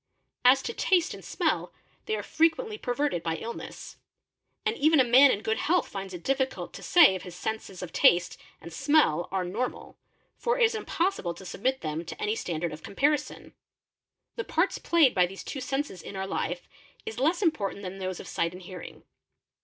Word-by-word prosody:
" - - -48
As 270 +1 +1
to 460 - -3
taste 360 -6 +2
and - - -10
smell, - - -1 0.4
they 435 - 0
are - - -4
frequently 420 +8 +1
perverted 250 - -1
by 165 -1 -2
illness; 230 +8 -8 0.7
and 435 +1 +1
fen 310 0 +5
a - - +7
man 255 +3 +7
in 205 - 0
good 220 0 0
health 355 +4 +2
finds 195 -1 -6
it 175 -2 -8
difficult 265 -1 -1
to - - -9
say 340 - +6
if 185 - -4
his 180 0 -9
senses 195 -2 -5
of 180 - -8
taste 175 0 +4 0.2
ane 170 - -9
smell 265 - +2
are 190 -1 -1
normal, 225 +8 -4 0.4
for 475 +1 +1
it - - +3
is 455 0 +4
impossible 360 - -1
to 190 - -12
submit 260 +9 -1
them 155 +1 -3
to 170 - -9
any 210 +1 0
standard 170 -4 -3
of 155 - -9
comparison, 290 +7 0
ie - - -29 0.8
The 470 - -1
parts - - 0
played 320 -7 +4
by 180 -2 +3
these 195 +2 -9
two 270 - -5
senses 270 - -3
in - - -9
our 190 0 -3
life 175 -2 -3 0.4
is 220 +1 -5
less 335 +8 +2
important 205 - 0
shar 190 +1 -6
those 185 -1 -4
of - - -9
sight 170 +1 -1
and 180 - -10
hearing. 180 -1 -10
220 Hz, 200 wpm, -28 LUFS, 180-305 Hz, 0.8 s, a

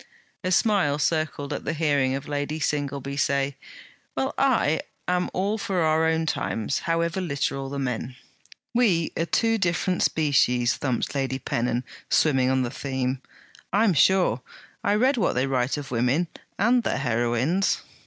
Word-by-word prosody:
A 185 - -1
smile 185 -6 +3
circled 155 -2 -1
at - - -4
the 155 - -2
hearing 145 -4 +1
of 140 +1 -6
Lady 145 +1 -2
Singleby 140 -1 -2
say: 140 -1 +1 0.6
'Well, - - -1
I - - +2 0.3
am 180 0 +1
all 200 +4 -1
for 190 -3 -1
our 160 0 +3
own 160 0 +1
times, 125 -5 -1
however 170 +2 0
literal 140 -4 -2
the 140 - -5
men.' 125 -2 -3 0.6
'We 200 -10 +2
are 165 - -1
two 225 +8 +2
different 180 0 0
species!' 125 -5 +2
thumped 130 -5 -2
Lady 135 -2 -1
Pennon, 120 -1 -1 0.3
swimming 135 -4 +3
on 130 0 +2
the 120 - -3
theme. 130 -1 -2 0.5
'I 210 - +3
am 210 -5 +4
sure, 170 - +3 0.4
I 205 - +2
read 255 +5 +3
what 205 - +1
they 125 +1 +1
write 130 0 0
of 140 -3 -7
women! 130 +8 +1 0.3
And 240 +5 +3
their - - -1
heroines!' 125 +8 +1
145 Hz, 155 wpm, -25 LUFS, 130-175 Hz, 0.6 s, am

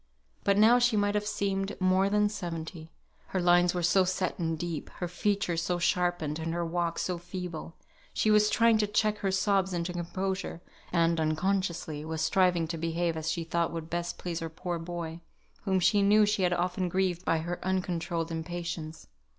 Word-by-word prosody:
But 200 0 +3
now 225 +4 +6
she 245 -3 +3
might 205 0 +2
have 210 0 -1
seemed 195 -1 -2
more 185 +1 +3
than 210 0 +3
seventy; 165 -4 -6 0.4
her 190 - -2
lines 175 0 +4
were 175 - -1
so 185 +3 +4
set 185 0 -1
and 165 -1 -1
deep, 170 -1 -4
her 175 - -3
features 180 -1 0
so 175 +1 -1
sharpened, 175 -3 0
and 165 +1 -3
her 170 0 -1
walk 170 0 -1
so 180 -2 -2
feeble. 175 -2 -6 0.4
She 215 - +2
was 210 0 +5
trying 230 0 +4
to 210 - +2
check 210 0 +1
her 195 - 0
sobs 190 0 +1
into 175 0 -2
composure, 185 +1 -3 0.3
and 170 -1 +2
(unconsciously) 160 -1 -1
was 160 0 -4
striving 180 -3 +2
to 165 - -3
behave 165 +1 -1
as 160 0 -3
she 170 +1 -1
thought 170 0 0
would 165 -1 -6
best 175 0 -2
please 170 -2 -4
her 165 -1 -4
poor 175 +1 -4
boy, 165 -1 -6 0.4
whom 190 -2 +2
she 205 +3 +3
knew 210 +2 +5
she 210 -1 0
had 180 -1 +2
often 180 +1 -1
grieved 185 -1 0
by 165 - +2
her 170 +2 -4
uncontrolled 175 -3 -1
impatience. 165 -1 -5
175 Hz, 185 wpm, -29 LUFS, 165-195 Hz, 0.4 s, now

